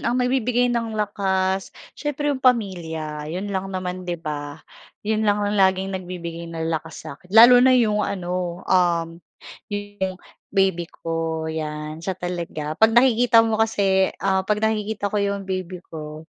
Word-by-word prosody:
ang 245 Hz, -, 0 dB
mabibigay 250 Hz, -1 st, +1 dB
ng 230 Hz, -2 st, -2 dB
lakas, 190 Hz, -2 st, -1 dB, 0.2 s
siyempre 295 Hz, -1 st, -2 dB
'yong 260 Hz, -, -4 dB
pamilya, 160 Hz, -, 0 dB
'yon 190 Hz, +5 st, -4 dB
lang 190 Hz, 0 st, -2 dB
naman, 185 Hz, -1 st, -4 dB
'di 175 Hz, -, -1 dB
ba? 150 Hz, -1 st, -6 dB, 0.4 s
'Yon 215 Hz, 0 st, 0 dB
lang 205 Hz, 0 st, +2 dB
ang 205 Hz, -, 0 dB
laging 190 Hz, 0 st, +2 dB
nagbibigay 170 Hz, -2 st, -6 dB
ng 165 Hz, 0 st, -3 dB
lakas 160 Hz, -1 st, -5 dB
sa'kin. 160 Hz, +6 st, -10 dB
Lalo 245 Hz, +2 st, +9 dB
na 255 Hz, 0 st, +6 dB
'yong 215 Hz, -4 st, +2 dB
ano, 180 Hz, -2 st, -3 dB
um, 170 Hz, -2 st, +1 dB, 0.5 s
'yo 205 Hz, -, -2 dB, 0.2 s
yong 190 Hz, -1 st, -1 dB, 0.3 s
baby 190 Hz, -4 st, +1 dB
ko, 165 Hz, -1 st, -3 dB
'yan, 155 Hz, 0 st, -5 dB
siya 185 Hz, +2 st, -3 dB
talaga. 170 Hz, -3 st, -5 dB
'Pag 225 Hz, +1 st, +5 dB
nakikita 240 Hz, -2 st, +5 dB
mo 220 Hz, -1 st, 0 dB
kasi 195 Hz, -3 st, +2 dB, 0.2 s
ah 190 Hz, -1 st, +3 dB
'pag 210 Hz, +2 st, 0 dB
nakikita 215 Hz, -1 st, -1 dB
ko 210 Hz, -, +1 dB
'yong 200 Hz, -1 st, -1 dB
baby 185 Hz, -1 st, -5 dB
ko, 155 Hz, 0 st, -7 dB
190 Hz, 155 wpm, -23 LUFS, 170-215 Hz, 0.5 s, Lalo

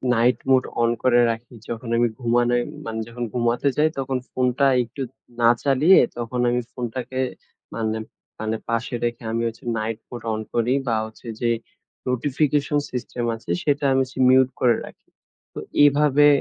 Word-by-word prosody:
night 120 Hz, +2 st, +3 dB
mode 130 Hz, -1 st, +4 dB
on 115 Hz, 0 st, +3 dB
করে 120 Hz, -1 st, +5 dB
রাখি। 115 Hz, +2 st, -8 dB, 0.2 s
যখন 115 Hz, 0 st, -5 dB
আমি 120 Hz, 0 st, +4 dB
ঘুমানে 120 Hz, 0 st, +2 dB, 0.3 s
মানে 110 Hz, 0 st, -4 dB
যখন 120 Hz, +1 st, -6 dB
ঘুমাতে 120 Hz, +2 st, +1 dB
যাই 155 Hz, +1 st, +4 dB
তখন 130 Hz, -1 st, -1 dB
ফোনটা 130 Hz, +2 st, +2 dB, 0.2 s
একটু 120 Hz, +4 st, -9 dB, 0.4 s
না 115 Hz, -, +6 dB
চালিয়ে 145 Hz, +7 st, +6 dB, 0.2 s
তখন 120 Hz, +1 st, -3 dB
আমি 125 Hz, 0 st, +1 dB
ফোনটাকে 125 Hz, +1 st, -4 dB, 0.6 s
মানে 110 Hz, -1 st, -1 dB, 0.4 s
মানে 110 Hz, +1 st, -1 dB
পাশে 115 Hz, +2 st, -1 dB
রেখে 120 Hz, 0 st, -2 dB
আমি 115 Hz, +1 st, -1 dB
হচ্ছে 115 Hz, 0 st, -8 dB, 0.2 s
night 110 Hz, +1 st, -3 dB
mode 120 Hz, -2 st, -8 dB
অন 110 Hz, -, -2 dB
করি 120 Hz, +2 st, +2 dB
বা 115 Hz, -, +2 dB
হচ্ছে 110 Hz, +2 st, -13 dB
যে 120 Hz, -, +2 dB, 0.6 s
notification 145 Hz, +3 st, +1 dB
system 125 Hz, -1 st, -4 dB
আছে 110 Hz, -, -14 dB
সেটা 145 Hz, -1 st, +1 dB
আমি 135 Hz, -, +3 dB
হচ্ছে 130 Hz, +1 st, -9 dB
mute 130 Hz, 0 st, +5 dB
করে 120 Hz, -2 st, +4 dB
রাখি। -, -, -15 dB, 0.5 s
তো -, -, -6 dB, 0.3 s
এভাবে 145 Hz, 0 st, +5 dB
120 Hz, 160 wpm, -23 LUFS, 115-130 Hz, 0.6 s, না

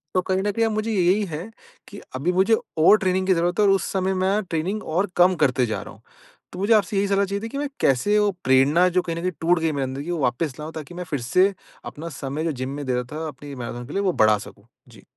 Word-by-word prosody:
तो 185 Hz, -, +4 dB
कहीं 190 Hz, +1 st, -1 dB
न 205 Hz, -, 0 dB
कहीं 225 Hz, +2 st, +1 dB
अब 220 Hz, -, 0 dB
मुझे 215 Hz, +1 st, -1 dB
यही 190 Hz, +1 st, +2 dB
है 170 Hz, +4 st, -6 dB, 0.4 s
कि 200 Hz, -, -10 dB, 0.2 s
अभी 155 Hz, +8 st, 0 dB
मुझे 195 Hz, +5 st, +4 dB, 0.2 s
और 170 Hz, +7 st, +6 dB
ट्रेनिंग 185 Hz, -1 st, 0 dB
की 190 Hz, -, +5 dB
ज़रूरत 175 Hz, +3 st, 0 dB
है 210 Hz, -, +5 dB
और 195 Hz, -, +5 dB
उस 195 Hz, -, +2 dB
समय 190 Hz, 0 st, 0 dB
मैं 190 Hz, +3 st, +1 dB
ट्रेनिंग 180 Hz, +6 st, -2 dB
और 180 Hz, +5 st, -1 dB
कम 180 Hz, +1 st, +5 dB
करते 125 Hz, -2 st, +2 dB
जा 110 Hz, -, -3 dB
रहा -, -, -11 dB
हूँ। -, -, -19 dB, 0.5 s
तो 180 Hz, -, -7 dB
मुझे 205 Hz, +4 st, +3 dB
आपसे 205 Hz, -1 st, +2 dB
यही 200 Hz, +1 st, +2 dB
सलाह 200 Hz, 0 st, +2 dB
चाहिए 200 Hz, +1 st, -3 dB
थी 225 Hz, -, -4 dB
कि 275 Hz, -, -6 dB
मैं 290 Hz, -, -1 dB
कैसे 140 Hz, +11 st, +3 dB
वो 210 Hz, 0 st, +3 dB
प्रेरणा 140 Hz, +7 st, +4 dB
जो 180 Hz, +1 st, +1 dB
कहीं 165 Hz, -1 st, -4 dB
न 170 Hz, -, -4 dB
कहीं 185 Hz, +1 st, -1 dB
टूट 170 Hz, +1 st, +3 dB
गई 160 Hz, -1 st, 0 dB
मेरे 140 Hz, -2 st, -2 dB
अंदर 130 Hz, +1 st, -4 dB
कि 175 Hz, -, -4 dB
वो 170 Hz, -, -2 dB
वापस 125 Hz, +3 st, -1 dB
लाऊँ 155 Hz, +2 st, -7 dB
ताकि 155 Hz, +1 st, -8 dB
मैं 180 Hz, -, -4 dB
फिर 140 Hz, -4 st, -1 dB
से 195 Hz, +2 st, +4 dB, 0.3 s
अपना 165 Hz, +3 st, -7 dB
समय 140 Hz, +4 st, -3 dB
जो 165 Hz, -, 0 dB
जिम 130 Hz, -, -3 dB
में 145 Hz, 0 st, -5 dB
दे 130 Hz, -, -1 dB
रहा 125 Hz, -, 0 dB
था 160 Hz, +1 st, -4 dB
अपनी 145 Hz, 0 st, -9 dB
मैराथन 120 Hz, 0 st, -6 dB
के -, -, -8 dB
लिए 200 Hz, -, 0 dB
वो 190 Hz, -3 st, +1 dB
बढ़ा 110 Hz, -1 st, +5 dB
सकूँ। 100 Hz, +1 st, -12 dB, 0.2 s
जी। -, -, -17 dB
175 Hz, 280 wpm, -23 LUFS, 145-195 Hz, 0.5 s, और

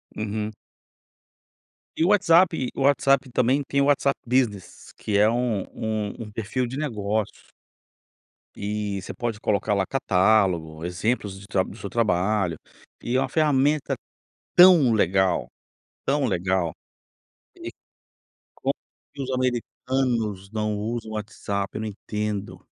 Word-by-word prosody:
Uhum. 105 Hz, 0 st, -3 dB, 1.4 s
E 165 Hz, -, +2 dB
o -, -, +3 dB
WhatsApp 170 Hz, -8 st, +4 dB
o -, -, -3 dB
WhatsApp 140 Hz, -1 st, +3 dB
também 125 Hz, +4 st, +2 dB
tem 140 Hz, 0 st, +1 dB
o -, -, +3 dB
WhatsApp 140 Hz, -1 st, +2 dB
Business, 115 Hz, -7 st, -1 dB
que 105 Hz, -2 st, -1 dB
é 105 Hz, +1 st, +5 dB
um 120 Hz, -4 st, 0 dB
um 110 Hz, +1 st, -3 dB
um 105 Hz, -, -11 dB
perfil 115 Hz, +4 st, -2 dB
de 130 Hz, +3 st, -6 dB
negócios. 110 Hz, -7 st, -3 dB, 1.0 s
E 105 Hz, -1 st, -3 dB
você -, -, -7 dB
pode 115 Hz, -3 st, -3 dB
colocar 105 Hz, 0 st, 0 dB
lá 95 Hz, -1 st, +1 dB
catálogo, 90 Hz, -9 st, +2 dB
exemplos 95 Hz, +2 st, -2 dB
de 100 Hz, -, -13 dB
tr 95 Hz, -3 st, +1 dB
do 100 Hz, -, -10 dB
seu 100 Hz, -, -6 dB
trabalho, 100 Hz, -5 st, +1 dB, 0.4 s
e 120 Hz, -, -2 dB
é -, -, +4 dB
uma 135 Hz, -1 st, 0 dB
ferramenta 150 Hz, -1 st, +2 dB, 0.6 s
tão 175 Hz, -9 st, +8 dB
legal, 95 Hz, -3 st, +2 dB, 0.6 s
tão 140 Hz, 0 st, +1 dB
legal, 95 Hz, -4 st, 0 dB, 0.8 s
que -, -, -7 dB, 0.8 s
como -, -, -1 dB, 0.4 s
que 140 Hz, -1 st, -5 dB
os 130 Hz, -, -4 dB
americanos 120 Hz, -5 st, -1 dB
não 105 Hz, -1 st, -1 dB
usam 110 Hz, +1 st, -4 dB
o -, -, -6 dB
WhatsApp, 100 Hz, -1 st, -4 dB
não 110 Hz, -, -3 dB
entendo. 105 Hz, 0 st, -4 dB
110 Hz, 130 wpm, -24 LUFS, 100-130 Hz, 1.4 s, tão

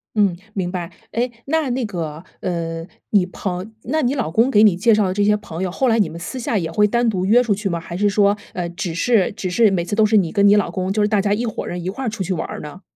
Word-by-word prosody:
嗯， 200 Hz, -4 st, +3 dB, 0.2 s
明 180 Hz, -3 st, -2 dB
白。 175 Hz, -2 st, -4 dB, 0.2 s
哎， 245 Hz, +2 st, 0 dB, 0.2 s
那 310 Hz, -1 st, 0 dB
那 255 Hz, +1 st, -1 dB
个， 165 Hz, -5 st, -5 dB, 0.2 s
呃， 165 Hz, -2 st, -3 dB, 0.3 s
你 200 Hz, -4 st, +4 dB
朋 185 Hz, +3 st, -5 dB
那 310 Hz, +6 st, 0 dB
你 250 Hz, +3 st, +1 dB
老 250 Hz, -, -1 dB
公 230 Hz, +10 st, +2 dB
给 210 Hz, -, +5 dB
你 210 Hz, -5 st, +6 dB
介 220 Hz, +5 st, +3 dB
绍 210 Hz, -2 st, +3 dB
的 185 Hz, -, -1 dB
这 205 Hz, +1 st, +1 dB
些 210 Hz, 0 st, +4 dB
朋 175 Hz, -2 st, -6 dB
友， 180 Hz, -, -2 dB
后 260 Hz, +7 st, 0 dB
来 230 Hz, -, +3 dB
你 205 Hz, -7 st, +3 dB
们 165 Hz, -, -8 dB
私 215 Hz, +9 st, -6 dB
下 230 Hz, -2 st, -2 dB
也 165 Hz, -3 st, -2 dB
会 210 Hz, +5 st, +3 dB
单 235 Hz, +2 st, +1 dB
独 185 Hz, -3 st, -1 dB
约 230 Hz, +5 st, +5 dB
出 230 Hz, -4 st, +1 dB
去 205 Hz, 0 st, -3 dB
吗？ 170 Hz, -2 st, -1 dB
还 170 Hz, +1 st, -7 dB
是 205 Hz, +2 st, +2 dB
说， 205 Hz, 0 st, +3 dB, 0.2 s
呃， 175 Hz, -2 st, -3 dB
只 175 Hz, -1 st, -4 dB
是 210 Hz, +2 st, +2 dB
只 185 Hz, -2 st, -4 dB
是 215 Hz, +2 st, +4 dB
每 175 Hz, -3 st, 0 dB
次 205 Hz, +4 st, -3 dB
都 215 Hz, -1 st, +4 dB
是 215 Hz, 0 st, +4 dB
你 170 Hz, -5 st, +1 dB
跟 200 Hz, -1 st, +4 dB
你 205 Hz, -, +6 dB
老 205 Hz, -, +2 dB
公 185 Hz, 0 st, -2 dB
就 215 Hz, -, +1 dB
是 205 Hz, -, +3 dB
大 210 Hz, -1 st, +2 dB
家 200 Hz, +1 st, +1 dB
一 235 Hz, +3 st, -1 dB
伙 220 Hz, -, -4 dB
人 175 Hz, -1 st, -5 dB
一 185 Hz, -, -2 dB
块 260 Hz, +6 st, -4 dB
出 210 Hz, -2 st, -6 dB
去 185 Hz, -, -4 dB
玩 165 Hz, -, -3 dB
儿 -, -, -6 dB
呢？ 150 Hz, +6 st, -10 dB
200 Hz, 315 characters per minute, -20 LUFS, 180-220 Hz, 0.3 s, 你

